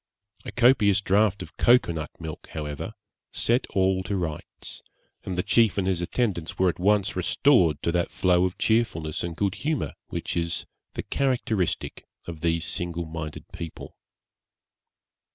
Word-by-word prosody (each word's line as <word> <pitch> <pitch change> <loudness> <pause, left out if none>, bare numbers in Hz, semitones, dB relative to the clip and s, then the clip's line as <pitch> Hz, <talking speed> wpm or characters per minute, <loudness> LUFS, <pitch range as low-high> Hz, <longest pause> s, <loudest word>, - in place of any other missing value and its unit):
A - - -5
copious 115 -5 +4
draught 100 +1 +2
of - - -14
cocoa 120 -6 +5
nut 80 -2 -4
milk, 80 -2 -7
however, 75 -2 -5 0.4
set 120 +2 +2
all 95 -1 +1
to 100 +1 -1
rights, 80 -4 -6 0.4
and 95 - -4
the 90 - +1
chief 115 -4 +3
and 95 - +1
his 95 -2 0
attendants 90 -3 -1
were 95 -1 +4
at 85 - -4
once 100 +1 +2
restored 90 - +3
to 85 - +1
that 85 0 0
flow 90 -1 +2
of 90 - -3
cheerfulness 95 -9 0
and 85 -1 -4
good 100 +1 0
humour, 155 -1 -2
which - - -4
is 85 -1 -1 0.3
the - - -3
characteristic 120 -9 -1 0.2
of 80 -3 -7
these 85 0 +1
single 85 +1 -3
minded 80 -1 -6
people. 85 -2 -8
90 Hz, 150 wpm, -26 LUFS, 85-105 Hz, 0.4 s, cocoa